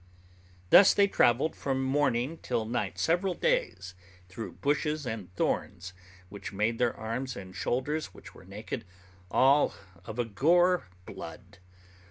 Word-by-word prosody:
Thus 195 - +8
they 200 - +5
travelled 135 -4 +2
from 135 -1 -2
morning 135 +1 0
till 120 -3 -2
night 115 +3 -3
several 175 +2 +1
days, 485 - -1 0.4
through 110 +5 -7
bushes 150 +1 -1
and 110 -6 -5
thorns, 90 +1 -2 0.3
which 100 +1 -8
made 110 +3 -1
their 120 -1 +1
arms 125 +4 -4
and 95 -3 -9
shoulders, 145 +9 -1
which - - -14
were - - -15
naked, 105 +5 -6 0.5
all 135 +8 +4 0.3
of 110 +5 -8
a 120 - 0
gore 175 - +3 0.2
blood. - - -10
125 Hz, 135 wpm, -29 LUFS, 110-155 Hz, 0.5 s, Thus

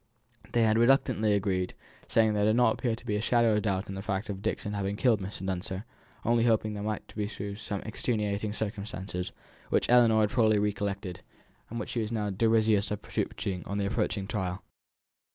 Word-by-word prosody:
They 120 - +4
had 110 0 +4
reluctantly 120 -3 +4
agreed, 95 -2 -1 0.3
saying 110 -1 +3
there 105 0 +2
did 110 +1 +4
not 120 -2 +4
appear 120 -3 -1
to 115 - -15
be 105 - 0
a - - -1
shadow 115 -1 +3
of 105 - +2
doubt 100 -2 -1
on 95 - -5
the 95 - -5
fact 100 +1 -2
of 100 -1 -4
Dixon's 105 0 -2
having 100 0 -1
killed 115 -2 +3
Mr. 95 0 -6
Dunster, 95 +2 -3 0.4
only 115 0 +3
hoping 110 -2 +2
there 105 - -5
might 105 0 -3
prove 105 0 -4
to - - -11
be 100 0 -4
some 105 -1 -4
extenuating 105 -2 -1
circumstances, 100 -4 -4 0.4
which - - +2
Ellinor 115 -3 +6
had 105 -1 +2
probably 110 -3 +4
recollected, 100 -3 -2 0.5
and 115 - -4
which 110 - -5
she 120 - -1
was 110 - -2
desirous 110 0 +2
of 105 - -4
producing 90 -3 -3
on 100 - -2
the 100 - 0
approaching 100 -1 -1
trial. 95 -3 -3
105 Hz, 195 wpm, -29 LUFS, 100-110 Hz, 0.5 s, Ellinor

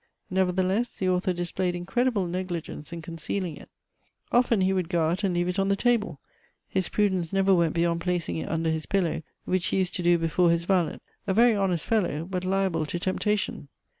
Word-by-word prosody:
Nevertheless 190 +4 +1
the 190 - -1
author 185 +1 +1
displayed 175 +1 -1
incredible 200 +4 0
negligence 175 -3 -4
in 170 -1 -6
concealing 165 +1 -4
it. - - -13 0.6
Often 240 -4 +3
he 190 +1 +3
would 185 -3 -1
go 170 -3 +2
out 180 +5 -2
and 185 -3 +1
leave 175 0 +1
it 180 +2 -1
on 195 - +2
the 200 - +3
table; 210 - +1 0.5
his 190 -1 -1
prudence 190 -5 +1
never 195 0 +3
went 170 -3 +2
beyond 170 0 +1
placing 175 - -1
it 80 - -4
under 160 0 0
his 160 -1 -3
pillow, 175 -4 0 0.2
which 185 -1 0
he - - 0
used 185 -2 0
to - - -2
do 175 0 +4
before 165 +1 +2
his 170 0 +2
valet, 175 -3 +1 0.3
a 190 - +1
very 235 +1 +6
honest 185 -5 0
fellow, 175 -8 0
but 185 0 -3
liable 185 -4 0
to 175 - -2
temptation. 190 -4 -1
180 Hz, 195 wpm, -26 LUFS, 170-195 Hz, 0.6 s, very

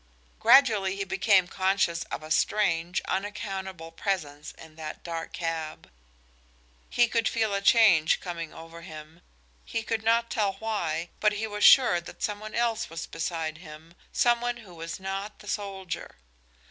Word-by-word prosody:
Gradually 215 -8 +5
he 200 - -2
became 190 0 +3
conscious 185 -3 +1
of - - -6
a 155 - -9
strange, 175 -3 +1
unaccountable 190 -4 -4
presence 155 -5 -3
in 160 -1 -14
that 155 -1 -7
dark 165 -1 -5
cab. 165 - -4 1.0
He 240 - +3
could 230 -1 +1
feel 220 -3 0
a 200 - 0
change 200 -8 +5
coming 170 -2 -6
over 165 +1 -11
him; 160 0 -11 0.4
he 225 - -3
could 225 0 -2
not 230 +1 +2
tell 205 -3 +1
why, 180 -6 -2
but 210 0 +3
he 210 +2 -2
was 210 -1 -4
sure 245 -10 +7
that 170 - -10
some 205 -1 -1
one 215 0 -8
else 230 -1 0
was 165 0 -5
beside 165 -1 -4
him, 160 0 -12 0.2
some 240 -1 +3
one 240 0 -1
who 180 - -13
was 165 +1 -6
not 195 +2 -5
the 205 - -15
soldier. 195 - -5
190 Hz, 160 wpm, -27 LUFS, 165-210 Hz, 1.0 s, sure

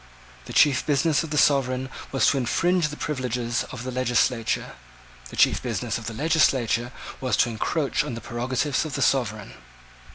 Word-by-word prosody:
The - - -9
chief 145 -2 +4
business 150 +1 +2
of 160 - -6
the 150 - -2
sovereign 130 -3 +2 0.2
was 135 - +2
to 140 - +3
infringe 170 +7 +1
the 150 0 -8
privileges 125 -4 -2
of 125 -2 -7
the 130 - -4
legislature. 125 -2 0 0.6
The - - -10
chief - - +3
business - - -2
of 110 - -9
the 115 - -5
legislature 130 -5 +2 0.3
was 130 -1 0
to 120 - +3
encroach 140 +6 -1
on 150 -6 -5
the - - -5
prerogatives 130 +4 -1
of 155 -4 -5
the - - +1
sovereign. 110 -6 0
130 Hz, 170 wpm, -24 LUFS, 120-150 Hz, 0.6 s, chief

